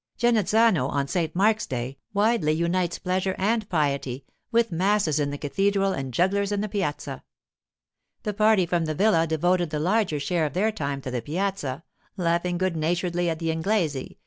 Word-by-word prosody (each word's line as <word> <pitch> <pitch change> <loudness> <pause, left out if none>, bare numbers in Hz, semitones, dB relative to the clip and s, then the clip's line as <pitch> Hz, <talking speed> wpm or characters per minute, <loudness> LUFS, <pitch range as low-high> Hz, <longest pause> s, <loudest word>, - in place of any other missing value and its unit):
Genazzano, 220 - +3
on 140 -1 -1
St 165 0 -1
Mark's 215 +4 +2
day, 130 +2 -4
wisely 205 -6 +2
unites 170 +1 0
pleasure 185 +1 -1
and 215 +2 0
piety, 140 -5 -1 0.3
with 230 -2 +2
masses 180 -3 +1
in 145 -1 0
the 145 - -4
cathedral 195 +6 +1
and 135 -1 -4
jugglers 195 - +1
in 205 - 0
the 215 - -2
piazza. 190 -8 -3 1.0
The 210 - -2
party 215 -2 +4
from 170 -1 0
the 155 -1 -2
villa 165 -3 +3
devoted 175 +2 +1
the 150 - -3
larger 180 -2 +1
share 160 +2 0
of 145 - -8
their 210 +6 +1
time 140 -9 -3
to 130 - -5
the 125 -1 -2
piazza, 165 - -3 0.3
laughing 175 0 0
good 185 -1 0
naturedly 175 +2 0
at 160 - -2
the 165 0 -1
'Inglese! 160 -5 -1
175 Hz, 170 wpm, -25 LUFS, 155-200 Hz, 1.0 s, party